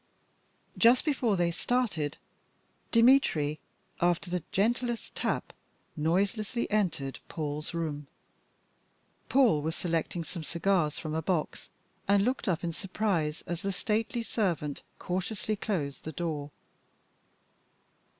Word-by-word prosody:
Just 240 +2 +6
before 250 -9 +2
they 175 -1 +2
started, 175 - 0 0.7
Dmitry, 230 - +4 0.4
after 175 +1 +2
the 180 -1 0
gentlest 240 +3 0
tap, - - -2 0.4
noiselessly 195 +8 0
entered 170 -10 0
Paul's 150 +1 -4
room. 150 -4 -3 1.2
Paul 245 - +5
was 160 +2 -2
selecting 170 0 -1
some 165 +1 -7
cigars 170 -2 +1
from 155 -1 -4
a 160 - 0
box, 165 -1 -2 0.4
and 200 0 +4
looked 250 -1 -1
up 175 -3 +1
in 170 -1 -1
surprise 180 -5 -1
as 175 0 -3
the 195 - -1
stately 220 +4 -1
servant 170 -11 -1 0.2
cautiously 190 +4 -2
closed 165 -10 -2
the 160 - -4
door. 150 -2 -3
175 Hz, 110 wpm, -30 LUFS, 155-215 Hz, 1.2 s, Just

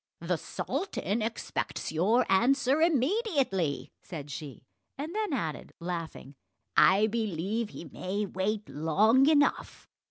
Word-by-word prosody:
"The 170 0 -1
sultan 265 - -3
expects 225 +1 -3
your 210 +10 +3
answer 265 +8 +3
immediately," 275 - +1
said 150 -5 -8
she; 140 -5 -8 0.3
and 305 +5 -5
then 430 -3 -1
added, 165 - -3
laughing, 170 -5 -5 0.4
"I 200 +3 +6
believe 215 0 -2
he 170 - -9
may 190 +7 -3
wait 205 +3 -2
long 215 - +3
enough!" 290 -2 +1
210 Hz, 115 wpm, -29 LUFS, 170-270 Hz, 0.4 s, I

